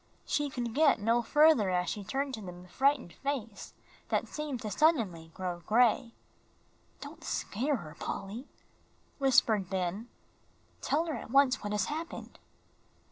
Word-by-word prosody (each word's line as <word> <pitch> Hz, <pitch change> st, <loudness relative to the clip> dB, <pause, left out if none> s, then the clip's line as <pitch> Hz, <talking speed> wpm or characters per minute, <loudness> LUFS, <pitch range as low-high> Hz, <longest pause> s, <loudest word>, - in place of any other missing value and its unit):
She 295 Hz, -1 st, 0 dB
could 240 Hz, -3 st, -4 dB
get 295 Hz, -3 st, +4 dB
no 230 Hz, +3 st, +2 dB
further 295 Hz, -4 st, +5 dB
as 180 Hz, -1 st, 0 dB
she 205 Hz, -, -3 dB
turned 270 Hz, +6 st, -2 dB
to 220 Hz, -, -5 dB
them 180 Hz, -2 st, -9 dB
a -, -, -16 dB
frightened 275 Hz, -2 st, +1 dB
face 255 Hz, -7 st, -5 dB, 0.3 s
that -, -, 0 dB
seemed 300 Hz, -4 st, -4 dB
to 215 Hz, -, -4 dB
suddenly 205 Hz, -, +2 dB
grow 180 Hz, -2 st, -3 dB
gray. 230 Hz, +5 st, +2 dB, 0.9 s
"Don't 310 Hz, +3 st, -10 dB
scare 275 Hz, +4 st, -1 dB
her, 165 Hz, -9 st, -8 dB
Polly," 220 Hz, +8 st, -5 dB, 0.7 s
whispered 225 Hz, -8 st, +3 dB
Ben. 190 Hz, +5 st, -2 dB, 0.7 s
"Tell 315 Hz, +4 st, +1 dB
her 320 Hz, -, -3 dB
at -, -, -6 dB
once 270 Hz, 0 st, +4 dB
what 205 Hz, -, -4 dB
has 210 Hz, -, +1 dB
happened." 320 Hz, +3 st, -6 dB
235 Hz, 145 wpm, -31 LUFS, 195-285 Hz, 0.9 s, further